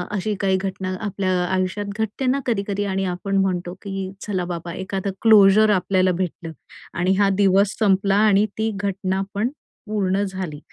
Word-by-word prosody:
अशी 210 +2 -1
काही 190 -1 +2
घटना 190 -1 -4
आपल्या 190 -2 -1
आयुष्यात 185 +3 -1
घटते 220 +4 -2
ना 260 +2 +2
कधी-कधी 205 -3 -1
आणि 195 -1 -1
आपण 185 +2 -2
म्हणतो, 180 -2 0
की 195 -2 -5
चला 185 -4 -2
बाबा 170 0 -5
एखादं 190 +1 -3
क्लोजर 215 -1 +6
आपल्याला 185 -1 +2
भेटलं. 175 -2 -4 0.4
आणि 180 +2 +1
हां, 200 0 +3
दिवस 195 +1 +3
संपला 195 -2 +3
आणि 205 0 +4
ती 220 0 0
घटना 190 -1 -1
पण 220 +4 0 0.4
पूर्ण 200 -2 0
झाली. 185 -6 -5
195 Hz, 155 wpm, -22 LUFS, 185-205 Hz, 0.4 s, क्लोजर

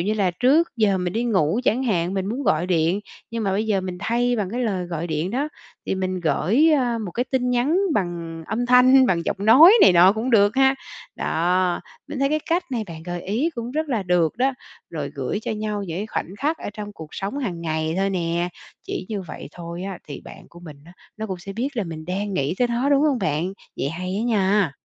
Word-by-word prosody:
như 205 +5 0
là 200 -4 +1
trước 265 - +3
giờ 205 -4 +2
mình 180 -1 -2
đi 235 +2 -1
ngủ 195 -2 +1
chẳng 245 +3 +2
hạn, 180 -5 0
mình 190 -1 -1
muốn 240 +7 -3
gọi 160 -3 +2
điện, 175 +2 +1 0.3
nhưng 230 -1 -3
mà 195 - +1
bây 210 +3 0
giờ 205 -3 +1
mình 185 -1 -5
thay 240 +3 +1
bằng 200 -3 -2
cái 240 +3 -3
lời 185 -5 -1
gọi 170 -1 -4
điện 160 +2 -2
đó 275 +7 -1 0.4
thì - - 0
mình 185 -1 -2
gởi, 225 - +3
ơ, 245 -5 +1
một 210 -5 -5
cái 245 - -1
tin 255 -1 0
nhắn 250 +8 +2 0.2
bằng 170 -3 -3
âm 240 +2 -2
thanh, 255 +1 +6
bằng 170 -5 +1
giọng - - -1
nói 265 - +8
này 190 - +8
nọ 180 +3 +7
cũng 225 +4 -2
được 205 -1 +4
ha. 270 0 +5 0.4
Đó, 180 +2 +1 0.3
mình - - -5
thấy 275 +1 +2
cái 305 +1 0
cách 345 +2 +2
này 235 -4 -2
bạn 160 -1 -8
gợi 175 0 -5
ý 235 - 0
cũng 235 0 -5
rất 310 +3 -2
là 235 -7 0
được 175 -1 +1
đó. 265 +2 +2 0.4
Rồi 150 -4 -4
gửi 140 +9 -3
cho - - -3
nhau 210 -1 -3
những 175 -3 -4
cái 205 - -3
khoảnh 200 -3 -4
khắc 310 +3 0
ở - - -5
trong 210 -1 -7
cuộc 160 -6 -10
sống 200 +8 -4
hàng 190 -12 -3
ngày 160 -1 -2
thôi 195 +1 +1
nè. 170 -1 -1 0.3
Chỉ 185 - -5
như 205 -3 -3
vậy 175 - -9
thôi 170 0 -7
á 190 -2 -5
thì 140 - -7
bạn - - -13
của 175 - -15
mình 155 -4 -10
á, 170 - -15 0.2
nó 220 0 -4
cũng 190 -3 -5
sẽ 195 +3 -8
biết 235 +7 -2
là 220 - 0
mình 160 -2 -7
đang 195 +3 -3
nghĩ 140 0 0
tới 245 - +2
nó, 240 +3 0
đúng 280 0 +4
hông 295 -4 +2
bạn? 170 -1 -1 0.2
Vậy - - -1
hay 185 +3 -4
á - - -1
nha. 200 - +2
195 Hz, 245 wpm, -23 LUFS, 175-240 Hz, 0.4 s, nói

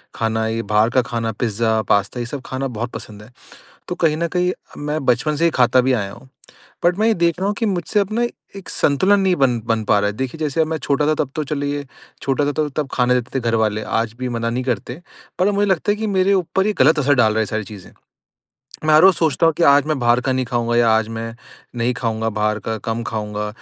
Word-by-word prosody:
खाना 110 0 -1
ये 115 +1 -2
बाहर 105 +2 +2
का 130 +1 +3
खाना, 115 -2 -3
पिज़्ज़ा, 110 0 0
पास्ता 100 +3 0
ये 120 - -2
सब 135 +3 -6
खाना 130 +1 -3
बहुत 120 -1 -5
पसंद 105 -1 -9
है। 115 - -16 0.6
तो - - -2
कहीं 155 -2 +1
न 170 +2 -1
कहीं 180 +1 0 0.3
मैं 150 0 -3
बचपन 150 +5 +1
से 165 - 0
ही 170 - +4
खाता 125 -2 +3
भी 130 +1 +1
आया 100 -5 -1
हूँ। 120 +5 -15 0.6
बट 175 0 +3
मैं 215 - +2
ये 225 - +3
देख 170 -2 +1
रहा 190 - -1
हूँ 205 - 0
कि 230 - 0
मुझसे 195 +1 0
अपना 215 +4 -1 0.3
एक 195 - -10
संतुलन 190 +8 +2
नहीं 190 -2 +2
बन 130 -4 +2
बन 115 -1 0
पा 105 - +3
रहा 105 0 +1
है। 105 - -9
देखिए, 130 +5 -4
जैसे 155 0 -1
अब 160 - +3
मैं 160 0 -3
छोटा 145 0 0
था 155 - +3
तब 145 -3 -1
तो 155 - -1
चलिए 145 0 -3 0.4
छोटा 140 +1 0
था 145 - 0
तो 150 0 -1
तब 145 0 -3
खाने 125 0 +2
देते 125 +2 -2
थे - - -2
घरवाले 110 -1 0 0.2
आज 115 -1 -3
भी 130 0 -3
मना 115 -1 -2
नहीं 125 +2 -2
करते। 125 - -3 0.4
पर 185 - +3
अब 205 - 0
मुझे 205 +1 +2
लगता 190 +3 +1
है - - -3
कि 220 +1 -3
मेरे 195 -1 +2
ऊपर 190 +1 0
ये 215 - +2
गलत 150 +4 +5
असर 145 0 +3
डाल 115 -5 +3
रहा 110 - -1
है - - +3
ये - - -2
सारी 110 +1 -3
चीज़ें। 100 -1 -12 0.9
मैं 155 - +4
हर 155 - +7
रोज़ 190 -1 +7
सोचता 160 0 +1
हूँ 165 - +4
कि 170 - +2
आज 140 -1 +5
मैं 155 -2 0
बाहर 120 0 +3
का 130 - -1
नहीं 130 0 -1
खाऊँगा 120 -1 -1
या 120 -1 +4
आज 110 -1 +2
मैं 115 0 -5 0.4
नहीं 120 +2 +1
खाऊँगा 115 -2 -2
बाहर 105 0 -1
का, 110 +2 -4
कम 115 +2 -4
खाऊँगा 105 -2 -4
130 Hz, 260 wpm, -20 LUFS, 115-155 Hz, 0.9 s, हर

